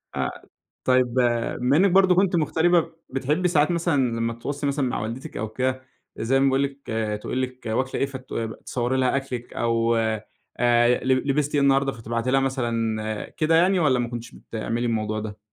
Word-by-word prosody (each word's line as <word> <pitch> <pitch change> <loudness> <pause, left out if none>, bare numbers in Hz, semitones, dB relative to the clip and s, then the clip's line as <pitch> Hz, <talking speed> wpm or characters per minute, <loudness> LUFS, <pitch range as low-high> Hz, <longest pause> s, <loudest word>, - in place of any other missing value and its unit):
آه. - - -1 0.5
طيب 130 -1 +3
بما 125 +2 +1
إنِّك 190 0 +4
برضه 190 -1 +5
كنتِ 190 -1 +3
مُغتربة، 165 +2 +2 0.2
بتحبّي 145 +7 0
ساعات 155 -1 +3
مثلًا 170 -2 +1 0.2
لمّا 115 0 -1
تتواصلي 140 +5 -4
مثلًا 140 -1 0
مع - - -2
والدتِك 120 +6 -6
أو 110 +1 -2
كده، 130 +3 -1 0.4
زي 135 +4 +1
ما 135 - +3
باقول 135 +1 +3
لِك 140 0 -6 0.3
تقول 130 - -2
لِك 130 -1 -5
واكلة 130 +4 -1
إيه؟ - - +4
فتصوّري 125 -1 -3
لها 130 +1 +2
أكلِك 130 -3 -4
أو 115 0 +1
أ 110 -1 0 0.8
ل 130 0 +3 0.2
لبستِ 145 +1 +1
إيه 140 - +3
النهارده؟ 135 0 +3
فتبعتي 115 +2 -3
لها 135 - +4
مثلًا 115 -5 -2
كده 160 +1 +1
يعني 180 +2 +4
والّا 130 -6 +3
ما 120 -1 -1
كنتيش 120 -1 -7
بتعملي 115 +2 -4
الموضوع 110 -2 -1
ده؟ 105 -1 -6
130 Hz, 175 wpm, -24 LUFS, 115-145 Hz, 0.8 s, برضه